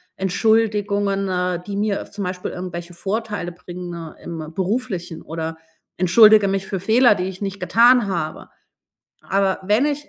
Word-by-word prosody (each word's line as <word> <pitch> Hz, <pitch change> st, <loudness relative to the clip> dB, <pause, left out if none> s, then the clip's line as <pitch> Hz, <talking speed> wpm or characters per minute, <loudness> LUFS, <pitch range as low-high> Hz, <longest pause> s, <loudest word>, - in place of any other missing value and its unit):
Entschuldigungen, 205 Hz, 0 st, +1 dB
äh, 180 Hz, -1 st, -1 dB
die 200 Hz, -, -5 dB
mir 205 Hz, 0 st, -1 dB
zum 205 Hz, -, -5 dB
Beispiel 180 Hz, 0 st, -4 dB
irgendwelche 175 Hz, -1 st, -6 dB
Vorteile 205 Hz, 0 st, -3 dB
bringen 175 Hz, -2 st, -8 dB
im 160 Hz, -2 st, -7 dB
Beruflichen, 185 Hz, -3 st, -3 dB
oder 160 Hz, 0 st, -5 dB, 0.4 s
entschuldige 210 Hz, +3 st, +6 dB
mich 195 Hz, 0 st, -1 dB
für 190 Hz, 0 st, -3 dB
Fehler, 225 Hz, +4 st, +4 dB
die 180 Hz, -2 st, -2 dB
ich 190 Hz, +1 st, -7 dB
nicht 200 Hz, 0 st, -4 dB
getan 240 Hz, 0 st, +5 dB
habe. 170 Hz, -3 st, -4 dB, 0.7 s
Aber 195 Hz, -1 st, +1 dB
wenn 210 Hz, +8 st, +2 dB
ich 295 Hz, 0 st, -3 dB
195 Hz, 145 wpm, -21 LUFS, 175-210 Hz, 0.7 s, entschuldige